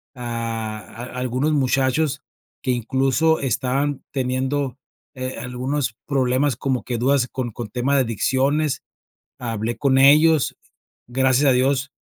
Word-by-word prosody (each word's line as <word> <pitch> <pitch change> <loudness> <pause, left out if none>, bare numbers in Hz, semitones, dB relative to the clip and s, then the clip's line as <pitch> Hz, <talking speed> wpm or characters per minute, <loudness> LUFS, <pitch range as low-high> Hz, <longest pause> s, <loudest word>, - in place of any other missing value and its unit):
ah, 115 -3 -4 0.2
a 125 +2 -8
algunos 130 +5 0
muchachos 135 +2 +1 0.4
que - - -3
incluso 135 +6 +1
estaban 135 +2 -1
teniendo, 130 0 -1 0.4
eh, 130 0 -5
algunos 125 +1 -2
problemas 130 0 +1
como 130 +1 -1
que 120 - -3
dudas 130 0 +2
con 130 -2 -3
con 115 0 -6
tema 130 +3 0
de 135 - +4
adicciones, 135 +6 0 0.6
hablé 115 -1 -3
con 135 -2 +2
ellos. 150 +2 +5 0.5
Gracias 130 +2 +3
a - - +5
Dios, 135 +2 +1
130 Hz, 125 wpm, -22 LUFS, 125-140 Hz, 0.6 s, ellos